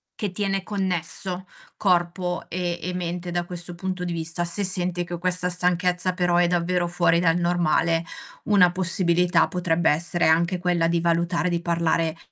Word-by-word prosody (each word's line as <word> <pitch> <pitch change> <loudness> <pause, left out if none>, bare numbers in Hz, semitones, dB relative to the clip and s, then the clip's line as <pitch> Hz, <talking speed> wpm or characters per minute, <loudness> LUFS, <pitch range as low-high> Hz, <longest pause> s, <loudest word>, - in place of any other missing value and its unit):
che 205 -3 -3
tiene 195 -1 -1
connesso 185 -1 -3 0.3
corpo 180 -1 0
e 175 -1 -2
e 180 - -4
mente 175 0 -4
da 175 0 -1
questo 175 0 -6
punto 185 0 -4
di 175 - -3
vista. 165 +1 -2
Se 175 +4 -1
senti 180 -1 -1
che 175 0 -5
questa 180 0 0
stanchezza 180 0 +1
però 180 -1 +1
è 175 0 +4
davvero 175 0 0
fuori 170 -1 +2
dal 165 -1 +3
normale, 170 -1 +1 0.4
una 195 -4 +5
possibilità 180 -1 +2
potrebbe 175 -2 +1
essere 170 +3 +1
anche 170 +3 +2
quella 175 -2 +1
di 170 0 +1
valutare 170 +1 +1
di 170 -1 -1
parlare, 165 -1 0
175 Hz, 160 wpm, -24 LUFS, 170-180 Hz, 0.4 s, una